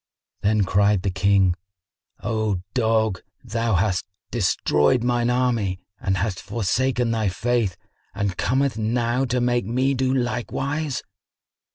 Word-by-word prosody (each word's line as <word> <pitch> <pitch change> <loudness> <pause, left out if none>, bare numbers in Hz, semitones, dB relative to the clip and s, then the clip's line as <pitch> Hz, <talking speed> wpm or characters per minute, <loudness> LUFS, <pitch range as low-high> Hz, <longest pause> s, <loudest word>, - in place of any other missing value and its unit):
Then 105 0 +3
cried 100 0 +2
the 100 - 0
King, 95 0 +3 0.7
"O 105 -3 0
dog, 110 -5 +1 0.2
thou 115 -2 0
hast 95 +1 +1 0.3
destroyed 90 -2 +2
mine 120 -1 +1
army 120 -7 +1 0.2
and 95 -1 0
hast 95 0 -2
forsaken 120 +2 0
thy 110 -3 +1
faith 110 -1 0 0.4
and 100 -3 -1
comest 130 +1 0
now 120 +3 +1
to 125 0 0
make 120 -4 +1
me 130 +4 +1
do 130 0 +1
likewise!" 135 +3 -2
115 Hz, 125 wpm, -23 LUFS, 100-125 Hz, 0.7 s, Then